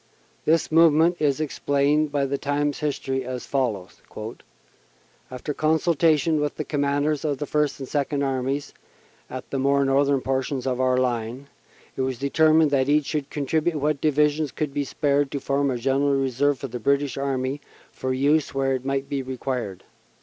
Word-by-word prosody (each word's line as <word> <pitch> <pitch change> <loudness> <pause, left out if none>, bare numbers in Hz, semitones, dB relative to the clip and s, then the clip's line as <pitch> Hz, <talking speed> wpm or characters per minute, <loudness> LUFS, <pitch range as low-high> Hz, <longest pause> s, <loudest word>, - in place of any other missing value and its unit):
This 160 +1 +2
movement 165 +1 +5
is 145 -2 +1
explained 145 0 +1
by 140 -1 +1
the 140 0 -2
Times 145 0 -1
History 135 -3 -2
as 125 0 -5
follows: 110 -10 -2 1.3
"After 130 +3 -5
consultation 160 0 +2
with 150 -1 -1
the - - -3
Commanders 145 +1 0
of 145 -3 -1
the 145 - -3
First 150 -1 0
and 135 - -6
Second 140 0 -1
Armies 135 +1 -2 0.6
at - - -7
the 135 - -1
more 140 +1 +2
northern 140 0 +2
portions 130 0 -2
of 130 -1 -1
our 130 0 +2
line, 125 +2 -2 0.5
it - - -2
was 130 -1 -1
determined 155 +3 +3
that 135 -1 +2
each 150 0 +3
should 150 -2 -3
contribute 155 +3 0
what 150 -1 0
divisions 150 -1 +2
could 150 -3 -3
be 145 0 -1
spared 145 0 +1
to 140 - -3
form 140 +1 0
a 125 - -1
General 135 +3 +1
Reserve 135 +1 +1
for 135 - -5
the 125 0 -6
British 140 +4 +1
Army 135 0 -2 0.3
for 130 - -4
use 140 +3 +1
where 135 0 +1
it 130 -1 -2
might 135 0 -2
be 140 -1 -2
required. 125 -6 -4
140 Hz, 170 wpm, -24 LUFS, 130-150 Hz, 1.3 s, movement